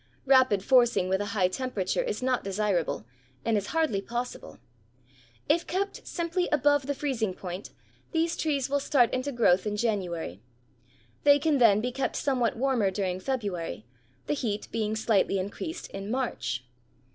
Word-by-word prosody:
Rapid 260 -7 +4
forcing 240 -7 +4
with 190 +1 +1
a 205 - -2
high 185 -2 +4
temperature 245 - -1
is 465 - -3
not 255 -1 +1
desirable 195 - -1 0.4
and 225 - +2
is 205 -1 -1
hardly 315 -12 +1
possible. 240 +4 -5 0.9
If 335 +3 +2
kept 395 +3 -3
simply 345 +1 -1
above 290 -2 +3
the 285 - -1
freezing 235 -10 -1
point, 180 +1 -6 0.4
these 330 +1 +1
trees 285 -4 0
will 285 +1 +1
start 255 -4 +3
into 255 +2 -1
growth 220 -6 +3
in 210 0 -2
January. 180 - -2 0.8
They 285 0 +7
can 295 -1 +1
then 215 -4 +6
be 250 +2 -2
kept 270 +2 -2
somewhat 255 -6 0
warmer 250 -5 +2
during 185 -1 -2
February, 190 - -3 0.4
the - - 0
heat 225 -7 -2
being 220 -1 -1
slightly 215 -3 +2
increased 205 - -5
in 195 +1 -6
March. 140 - -2
235 Hz, 155 wpm, -28 LUFS, 195-275 Hz, 0.9 s, They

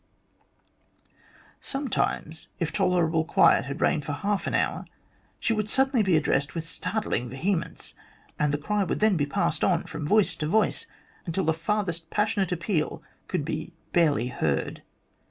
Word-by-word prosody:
Sometimes, 240 - -2
if 165 -2 -2
tolerable 170 -3 +2
quiet 165 - +4
had 140 +1 -5
reigned 150 - +2
for 145 - -3
half 200 +6 -1
an - - 0
hour, - - 0 0.5
she 230 - +1
would 215 -1 -1
suddenly 265 -1 +3
be 190 -5 +3
addressed 140 -1 0
with 165 - -2
startling 180 - -1
vehemence, 170 +7 -2 0.5
and 150 -1 +2
the 145 - +1
cry 205 +7 0
would 180 - -2
then 215 -2 +4
be 145 -4 0
passed 140 - 0
on - - +2
from 150 - -5
voice 210 +3 +3
to 150 - -2
voice, 215 +7 +1 0.4
until 175 +3 0
the 160 - +3
farthest 170 -1 -1
passion 210 0 +1
ate 190 - 0
appeal 170 -2 -1 0.2
could - - -2
be - - -4 0.2
barely 145 -8 +3
heard. 75 - -1
170 Hz, 155 wpm, -26 LUFS, 150-210 Hz, 0.5 s, quiet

